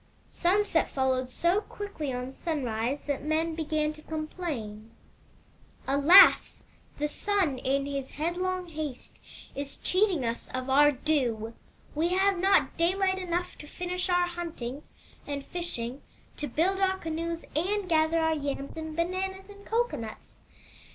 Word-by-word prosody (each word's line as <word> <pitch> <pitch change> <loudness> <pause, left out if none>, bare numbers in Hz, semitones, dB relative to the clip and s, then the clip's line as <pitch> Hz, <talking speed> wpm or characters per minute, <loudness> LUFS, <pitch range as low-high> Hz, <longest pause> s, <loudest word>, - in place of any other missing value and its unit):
Sunset 370 -1 +2
followed 260 -1 0
so 345 +9 +1
quickly 400 -11 -5
on 250 +1 -4
sunrise 265 -4 -2
that 285 -2 -3
men 320 +2 0
began 310 -1 -1
to 310 - -13
complain: 305 -10 -5 0.5
" - - -31
*Alas! 285 +8 +7 0.3
The 295 - 0
Sun, 355 -4 0
in 275 +2 0
his 275 -2 -4
headlong 360 +3 -1
haste, 305 -5 -6 0.3
is 280 0 -5
cheating 370 - +2
us 230 0 -3
of 255 +1 -3
our 290 +2 +6
due. 245 -6 -1 0.4
We 315 +3 +1
have 380 +1 +2
not 385 +2 +3
daylight 375 +2 +2
enough 355 -1 -3
to 295 - -10
finish 360 +3 -3
our 355 0 +3
hunting 330 -7 -5 0.5
and 280 -1 -4
fishing, 275 -8 -4 0.4
to 295 - -3
build 375 +7 +1
our 380 -1 +2
canoes, 330 0 -3
and 385 +5 0
gather 320 -1 +3
our 320 -1 +2
yams 280 -1 -4
and 315 -1 -5
bananas 380 +3 -2
and 405 0 -14
cocoanuts. 445 - -3
315 Hz, 135 wpm, -28 LUFS, 275-360 Hz, 0.5 s, Alas